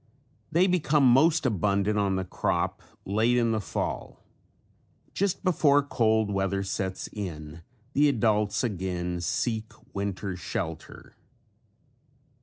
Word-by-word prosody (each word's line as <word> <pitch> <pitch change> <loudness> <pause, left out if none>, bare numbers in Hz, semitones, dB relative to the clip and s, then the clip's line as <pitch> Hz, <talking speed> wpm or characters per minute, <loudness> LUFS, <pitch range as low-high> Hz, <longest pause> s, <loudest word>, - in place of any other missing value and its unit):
They 170 +4 +4
become 155 -6 +2
most 150 +5 +4
abundant 105 -1 +1
on 100 -1 +1
the 95 0 -2
crop - - -1 0.2
late 110 +5 +2
in 115 -1 +2
the 110 -1 0
fall. - - -4 0.9
Just 200 -2 -1
before 145 -6 +4
cold 110 -6 +1
weather 100 0 0
sets 95 -1 -3
in 80 -5 -6 0.3
the 145 +1 +4
adults 105 -3 +1
again 90 -5 -2
seek 110 +5 -1 0.2
winter 100 -1 -3
shelter. 90 - -6
105 Hz, 110 wpm, -27 LUFS, 95-130 Hz, 0.9 s, They